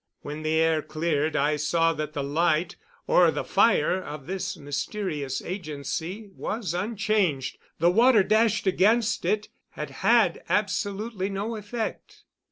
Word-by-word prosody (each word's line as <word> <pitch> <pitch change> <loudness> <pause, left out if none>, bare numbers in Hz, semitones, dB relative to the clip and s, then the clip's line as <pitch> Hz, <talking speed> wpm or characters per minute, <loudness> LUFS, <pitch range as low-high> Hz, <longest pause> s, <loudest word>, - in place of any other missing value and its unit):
When 150 +1 -6
the 155 0 0
air 160 -1 +3
cleared 155 -1 -1
I 150 +2 +2
saw 165 +2 +2
that 155 -1 -4
the 145 -3 -2
light, 155 +3 +1 0.3
or 175 -2 +5
the - - -2
fire 190 -3 +3
of 150 -2 -8
this 190 +2 -4
mysterious 145 -1 -3
agency, 175 - -5
was 210 -6 -3
unchanged. 195 - 0 0.2
The 170 +2 +4
water 230 +1 +5
dashed 215 +1 +2
against 215 +4 +2
it 210 0 0 0.2
had - - -6
had - - +4
absolutely 200 0 -1
no 205 +4 -3
effect. 220 +2 -5
180 Hz, 135 wpm, -26 LUFS, 155-210 Hz, 0.3 s, or